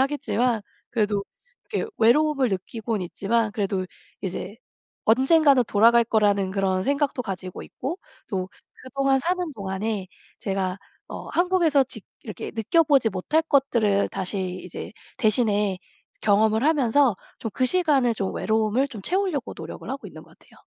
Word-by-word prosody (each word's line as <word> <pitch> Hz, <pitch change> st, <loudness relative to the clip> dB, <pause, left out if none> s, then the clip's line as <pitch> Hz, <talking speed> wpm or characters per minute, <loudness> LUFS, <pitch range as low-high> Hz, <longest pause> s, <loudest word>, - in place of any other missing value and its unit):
하겠지만 250 Hz, -4 st, +1 dB, 0.3 s
그래도 205 Hz, -3 st, 0 dB, 0.5 s
이렇게 450 Hz, -, -2 dB
외로움을 270 Hz, +3 st, +4 dB
느끼고는 205 Hz, +1 st, -3 dB
있지만 215 Hz, +3 st, 0 dB
그래도 195 Hz, -3 st, -1 dB, 0.3 s
이제 190 Hz, +2 st, -5 dB, 0.5 s
언젠가는 270 Hz, +3 st, +5 dB
돌아갈 230 Hz, +3 st, +5 dB
거라는 205 Hz, -4 st, +2 dB
그런 190 Hz, -1 st, 0 dB
생각도 280 Hz, 0 st, 0 dB
가지고 185 Hz, -4 st, -6 dB
있고 330 Hz, +8 st, -5 dB, 0.3 s
또 190 Hz, -3 st, -2 dB, 0.3 s
그동안 270 Hz, +1 st, +1 dB
사는 355 Hz, 0 st, -1 dB
동안에 195 Hz, 0 st, -3 dB, 0.3 s
제가 190 Hz, -1 st, -1 dB, 0.3 s
어 -, -, -7 dB
한국에서 345 Hz, -6 st, +3 dB
직 -, -, -8 dB, 0.2 s
이렇게 -, -, -6 dB
느껴보지 275 Hz, 0 st, +3 dB
못할 295 Hz, +13 st, +1 dB
것들을 235 Hz, -9 st, +2 dB
다시 185 Hz, -1 st, -3 dB
이제 -, -, -7 dB, 0.3 s
대신에 210 Hz, -4 st, +2 dB, 0.4 s
경험을 220 Hz, +3 st, +3 dB
하면서 280 Hz, -5 st, +3 dB, 0.2 s
좀 225 Hz, -, -4 dB
그 255 Hz, -, +1 dB
시간에 285 Hz, -8 st, +3 dB
좀 195 Hz, -3 st, -3 dB
외로움을 220 Hz, +5 st, +1 dB
좀 225 Hz, -6 st, -8 dB
채우려고 370 Hz, -, -1 dB
노력을 -, -, -8 dB
하고 275 Hz, +1 st, -5 dB
있는 -, -, -12 dB
것 -, -, -21 dB
같아요. -, -, -21 dB
225 Hz, 330 characters per minute, -24 LUFS, 200-275 Hz, 0.5 s, 언젠가는